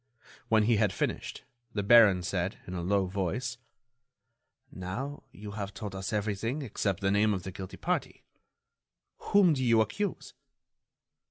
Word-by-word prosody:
When 110 Hz, -1 st, +4 dB
he 115 Hz, +1 st, +3 dB
had 105 Hz, -2 st, +2 dB
finished, -, -, -3 dB, 0.3 s
the 100 Hz, -, -1 dB
baron 100 Hz, -4 st, +6 dB
said, 95 Hz, 0 st, -2 dB
in 90 Hz, -, -7 dB
a 90 Hz, -, -3 dB
low 95 Hz, +2 st, +1 dB
voice: 100 Hz, +7 st, -3 dB, 1.1 s
"Now, 120 Hz, +11 st, -5 dB
you 105 Hz, 0 st, -9 dB
have 100 Hz, -1 st, -5 dB
told 105 Hz, -3 st, -6 dB
us 95 Hz, 0 st, -4 dB
everything 110 Hz, +6 st, -2 dB
except 100 Hz, -6 st, -2 dB
the 95 Hz, 0 st, +2 dB
name 105 Hz, +1 st, +3 dB
of 90 Hz, -, -5 dB
the 95 Hz, -, -6 dB
guilty 95 Hz, 0 st, -8 dB
party. -, -, -2 dB, 0.9 s
Whom 195 Hz, -5 st, +4 dB
do 130 Hz, -3 st, -1 dB
you 115 Hz, -2 st, +4 dB
accuse?" 195 Hz, -, -2 dB
105 Hz, 150 wpm, -30 LUFS, 95-115 Hz, 1.1 s, baron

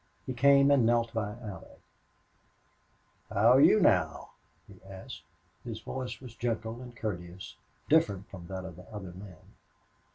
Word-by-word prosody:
He 130 Hz, -, -3 dB
came 140 Hz, +2 st, +5 dB
and 140 Hz, -4 st, +5 dB
knelt 115 Hz, 0 st, +2 dB
by 105 Hz, -2 st, -2 dB
Allie. 100 Hz, -3 st, -10 dB, 1.5 s
"How 110 Hz, +4 st, +4 dB
are 130 Hz, -, +6 dB
you 190 Hz, +8 st, +7 dB
now?" 90 Hz, -, +2 dB, 0.4 s
he 95 Hz, -3 st, -16 dB
asked. 95 Hz, -, -10 dB, 0.4 s
His 115 Hz, -3 st, -6 dB
voice 130 Hz, +2 st, -6 dB
was 125 Hz, -4 st, -11 dB
gentle 115 Hz, 0 st, -3 dB
and 125 Hz, -1 st, -11 dB
courteous, 90 Hz, -4 st, -6 dB, 0.3 s
different 100 Hz, -, +2 dB
from 85 Hz, -3 st, -10 dB
that 95 Hz, 0 st, -6 dB
of 90 Hz, -3 st, -9 dB
the 90 Hz, -, -14 dB
other 100 Hz, -4 st, -7 dB
men. 90 Hz, -1 st, -11 dB
110 Hz, 150 wpm, -30 LUFS, 95-125 Hz, 1.5 s, you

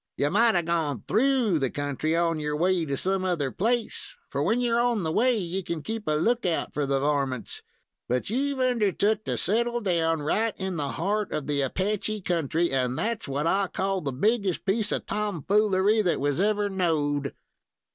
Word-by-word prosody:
You 145 Hz, -, +1 dB
might 225 Hz, +3 st, +4 dB
have 175 Hz, -2 st, +1 dB
gone 155 Hz, -9 st, -1 dB
through 235 Hz, -, +2 dB
the 135 Hz, -2 st, 0 dB
country 145 Hz, +3 st, -2 dB
on 165 Hz, -1 st, +1 dB
your 150 Hz, 0 st, -2 dB
way 180 Hz, 0 st, +2 dB
to 140 Hz, -2 st, -2 dB
some 190 Hz, +3 st, -1 dB
other 165 Hz, -8 st, 0 dB
place, 230 Hz, +2 st, -2 dB, 0.2 s
for, 140 Hz, -, -1 dB
when 215 Hz, +11 st, +2 dB
you're 235 Hz, -1 st, +1 dB
on 240 Hz, -5 st, +1 dB
the 160 Hz, -, -1 dB
way, 245 Hz, +6 st, +3 dB
you 185 Hz, 0 st, -3 dB
can 170 Hz, -3 st, -4 dB
keep 225 Hz, -3 st, -5 dB
a 155 Hz, -, +2 dB
lookout 180 Hz, +1 st, 0 dB
for 145 Hz, -2 st, -1 dB
the 135 Hz, 0 st, +1 dB
varmints; 135 Hz, -5 st, -1 dB, 0.5 s
but 125 Hz, +1 st, 0 dB
you've 270 Hz, +5 st, -1 dB
undertook 215 Hz, -4 st, +1 dB
to -, -, -1 dB
settle 235 Hz, +4 st, +1 dB
down 165 Hz, -6 st, 0 dB
right 220 Hz, +8 st, 0 dB
in 190 Hz, -1 st, -3 dB
the 145 Hz, -2 st, -1 dB
heart 205 Hz, +4 st, -1 dB
of 150 Hz, -, -3 dB
the 145 Hz, -1 st, 0 dB
Apache 205 Hz, +8 st, -1 dB
country, 170 Hz, -1 st, 0 dB
and 130 Hz, -1 st, 0 dB
that's 225 Hz, -3 st, -2 dB
what 140 Hz, +2 st, -2 dB
I 195 Hz, +3 st, +2 dB
call 190 Hz, +1 st, -1 dB
the 140 Hz, -, -2 dB
biggest 200 Hz, -, 0 dB
piece 210 Hz, +2 st, 0 dB
of -, -, -2 dB
tom 205 Hz, -6 st, -3 dB
foolery 210 Hz, +1 st, +3 dB
that 180 Hz, -4 st, 0 dB
was 145 Hz, +4 st, 0 dB
ever 210 Hz, 0 st, +2 dB
knowed." 150 Hz, -7 st, -1 dB
185 Hz, 190 wpm, -26 LUFS, 150-215 Hz, 0.5 s, might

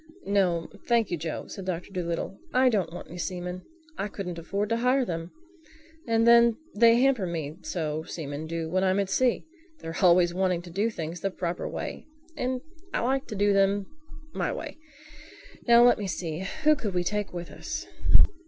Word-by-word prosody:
"No, 180 Hz, -5 st, +1 dB, 0.2 s
thank 235 Hz, -5 st, +2 dB
you, 175 Hz, -, 0 dB
Joe," 160 Hz, 0 st, -4 dB
said 195 Hz, -, -8 dB
Doctor 180 Hz, 0 st, -4 dB
Dolittle. 175 Hz, +1 st, -3 dB, 0.2 s
"I 255 Hz, 0 st, +6 dB
don't 195 Hz, -8 st, 0 dB
want 175 Hz, -, -8 dB
any 175 Hz, -, -8 dB
seamen. 180 Hz, 0 st, -4 dB, 0.4 s
I 195 Hz, -, 0 dB
couldn't 180 Hz, -4 st, -5 dB
afford 200 Hz, +5 st, -2 dB
to 230 Hz, -, +1 dB
hire 250 Hz, +2 st, +2 dB
them. 165 Hz, -2 st, -4 dB, 0.8 s
And 230 Hz, 0 st, +3 dB
then 235 Hz, -1 st, +6 dB, 0.2 s
they 230 Hz, +2 st, +6 dB
hamper 250 Hz, -6 st, +3 dB
me 160 Hz, -3 st, -4 dB
so, 155 Hz, -3 st, -2 dB
seamen 155 Hz, -1 st, -6 dB
do, 165 Hz, 0 st, -3 dB
when 185 Hz, +3 st, +1 dB
I'm 190 Hz, +1 st, +2 dB
at 195 Hz, -1 st, -1 dB
sea. 255 Hz, +1 st, +2 dB, 0.3 s
They're 165 Hz, 0 st, -6 dB
always 175 Hz, -1 st, +5 dB
wanting 180 Hz, -2 st, 0 dB
to 175 Hz, -, -10 dB
do 205 Hz, +6 st, +1 dB
things 170 Hz, -4 st, -5 dB
the 195 Hz, -, 0 dB
proper 175 Hz, -2 st, -3 dB
way; -, -, -6 dB, 0.3 s
and 255 Hz, -2 st, -2 dB, 0.3 s
I -, -, 0 dB
like 265 Hz, +3 st, 0 dB
to 215 Hz, -, -5 dB
do 205 Hz, 0 st, +3 dB
them 195 Hz, 0 st, +3 dB, 0.5 s
my -, -, -1 dB
way—Now 300 Hz, -5 st, -1 dB
let 245 Hz, -, +5 dB
me 205 Hz, -, -3 dB
see: 175 Hz, 0 st, -3 dB, 0.2 s
who 305 Hz, 0 st, +6 dB
could 210 Hz, -10 st, -4 dB
we 180 Hz, -, +2 dB
take 210 Hz, +2 st, -2 dB
with 175 Hz, -1 st, -6 dB
us?" -, -, -5 dB
195 Hz, 180 wpm, -27 LUFS, 170-230 Hz, 0.8 s, I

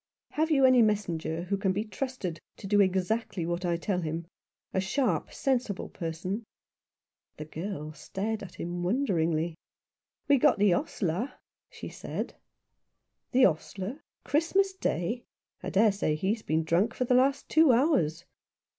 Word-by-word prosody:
Have 315 Hz, +2 st, +1 dB
you 275 Hz, -4 st, +5 dB
any 255 Hz, -2 st, +6 dB
messenger 175 Hz, -7 st, 0 dB
who 200 Hz, +2 st, -1 dB
can 195 Hz, -1 st, +1 dB
be 205 Hz, +3 st, -1 dB
trusted 215 Hz, -, -4 dB, 0.2 s
to -, -, -10 dB
do 205 Hz, +1 st, +4 dB
exactly 190 Hz, 0 st, 0 dB
what 175 Hz, +2 st, -2 dB
I 170 Hz, -1 st, +1 dB
tell 180 Hz, +1 st, -1 dB
him 165 Hz, +1 st, -3 dB, 0.2 s
— -, -, -51 dB
a 190 Hz, -, +1 dB
sharp, 190 Hz, -, 0 dB
sensible 250 Hz, -7 st, -1 dB
person? 180 Hz, +5 st, -4 dB, 0.4 s
" -, -, -56 dB
The 155 Hz, -, -6 dB
girl 155 Hz, -1 st, -5 dB
stared 210 Hz, +6 st, -4 dB
at 195 Hz, -3 st, -9 dB
him 175 Hz, +1 st, -4 dB
wonderingly. 175 Hz, -, +1 dB, 0.7 s
"We've 280 Hz, -3 st, +4 dB
got -, -, +5 dB
the 205 Hz, -2 st, +4 dB
ostler," 180 Hz, -, -1 dB, 0.4 s
she -, -, -8 dB
said. -, -, -5 dB, 0.5 s
" -, -, -53 dB
The 260 Hz, 0 st, +6 dB
ostler? 195 Hz, -, -2 dB, 0.2 s
Christmas 340 Hz, +8 st, +2 dB
Day? 230 Hz, -, -1 dB, 0.4 s
I -, -, -4 dB
dare 210 Hz, +2 st, +4 dB
say 195 Hz, -6 st, 0 dB
he's 200 Hz, +8 st, -1 dB
been 160 Hz, -4 st, 0 dB
drunk 170 Hz, +7 st, +1 dB
for 255 Hz, -, 0 dB
the 250 Hz, -, +2 dB
last 265 Hz, +3 st, +3 dB
two 315 Hz, -3 st, +5 dB
hours." 180 Hz, -, +2 dB
195 Hz, 155 wpm, -29 LUFS, 170-245 Hz, 0.7 s, any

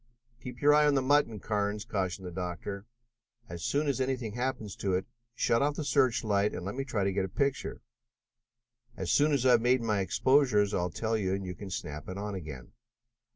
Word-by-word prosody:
"Keep 125 Hz, +1 st, -8 dB
your 145 Hz, +1 st, +7 dB
eye 150 Hz, 0 st, +5 dB
on 145 Hz, -, +3 dB
the 135 Hz, -, +3 dB
mutton, 130 Hz, -5 st, +2 dB
Carnes," 105 Hz, 0 st, -2 dB
cautioned 95 Hz, -2 st, -2 dB
the 90 Hz, -, -5 dB
doctor. 95 Hz, +3 st, -5 dB, 0.6 s
"As 85 Hz, -5 st, -7 dB
soon 145 Hz, +1 st, 0 dB
as 135 Hz, -1 st, 0 dB
anything 130 Hz, -5 st, -2 dB
happens 120 Hz, -4 st, -3 dB
to 100 Hz, -5 st, -1 dB
it, 95 Hz, -, -1 dB, 0.3 s
shut 115 Hz, -1 st, +2 dB
off 145 Hz, +1 st, +1 dB
the 155 Hz, -, -3 dB
search 130 Hz, -5 st, +2 dB
light 105 Hz, -1 st, +1 dB
and 90 Hz, -, -5 dB
let 100 Hz, -, -3 dB
me 135 Hz, -, -3 dB
try 115 Hz, -7 st, -1 dB
to 95 Hz, 0 st, 0 dB
get 95 Hz, 0 st, 0 dB
a 95 Hz, -, -3 dB
picture. 140 Hz, +7 st, -1 dB, 1.2 s
As 95 Hz, -3 st, -2 dB
soon 150 Hz, +1 st, +4 dB
as 140 Hz, -3 st, +1 dB
I 130 Hz, -, +6 dB
have 120 Hz, -2 st, +5 dB
made 125 Hz, 0 st, +3 dB
my 105 Hz, -3 st, +1 dB
exposures 105 Hz, 0 st, +3 dB
I'll 90 Hz, 0 st, 0 dB
tell 110 Hz, +7 st, -2 dB
you, 95 Hz, -3 st, 0 dB
and 100 Hz, 0 st, -5 dB
you 90 Hz, -, -4 dB
can 100 Hz, +2 st, -9 dB
snap 75 Hz, -4 st, -6 dB
it 95 Hz, -, -5 dB
on 105 Hz, +1 st, -4 dB
again. 75 Hz, -9 st, -8 dB
105 Hz, 215 wpm, -30 LUFS, 95-130 Hz, 1.2 s, your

